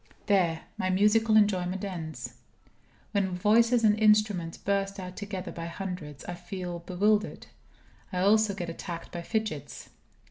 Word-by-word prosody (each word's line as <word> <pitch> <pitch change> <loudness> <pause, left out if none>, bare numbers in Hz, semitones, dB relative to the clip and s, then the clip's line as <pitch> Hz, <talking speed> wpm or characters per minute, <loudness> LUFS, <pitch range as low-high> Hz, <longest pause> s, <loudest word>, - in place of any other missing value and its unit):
There, 175 -6 +2 0.2
my 185 - 0
musical 215 +3 +4
enjoyment 190 -2 +2
ends. 165 -5 -6 0.8
When 195 -3 0
voices 230 +5 +4
and 210 -1 +4
instruments 210 -6 +3
burst 195 0 -1
out 180 -1 -7
together 200 -3 -5
by 165 0 -6
hundreds, 170 -5 -6
I 175 - -4
feel 175 0 -6
bewildered. 205 +5 0 0.7
I 185 - -3
also 210 +1 +4
get 175 -3 -4
attacked 165 0 -6
by 175 - -5
fidgets. 185 - -4
190 Hz, 135 wpm, -28 LUFS, 175-210 Hz, 0.8 s, musical